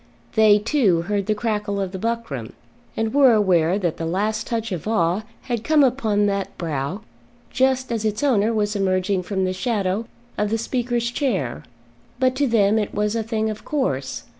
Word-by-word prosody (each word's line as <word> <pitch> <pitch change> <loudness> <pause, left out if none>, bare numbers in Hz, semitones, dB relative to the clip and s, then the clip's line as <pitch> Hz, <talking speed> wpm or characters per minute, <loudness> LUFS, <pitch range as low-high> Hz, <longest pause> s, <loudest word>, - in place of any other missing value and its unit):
They, 215 -1 +6
too, 210 - +2
heard 200 +1 -2
the 215 - +1
crackle 210 -2 -2
of 190 -2 -2
the 190 - -6
buckram, 225 - -3 0.4
and 225 0 -1
were 270 -4 +6
aware 185 -4 +3
that 175 -5 -1
the 165 - -3
last 215 +5 -1
touch 225 -2 -2
of 180 +1 -4
awe 180 -3 +1 0.2
had 240 -3 -3
come 305 +1 +4
upon 225 -6 +2
that 200 -1 -2
brow 160 +3 -3 0.5
just 260 -1 +1
as 225 -2 -1
its 215 +3 -1
owner 230 -6 +3
was 210 -1 0
emerging 190 -1 +1
from 190 +1 -1
the 185 - -1
shadow 205 0 -1 0.3
of 210 0 +1
the 225 - 0
Speaker's 240 0 -1
chair; 195 - -2 0.5
but 255 0 +2
to 285 0 +2
them 220 -2 +3
it 210 - -3
was 210 +1 0
a 230 - 0
thing 220 0 -1
of 215 - -8
course. 140 - -2
210 Hz, 185 wpm, -22 LUFS, 190-230 Hz, 0.5 s, They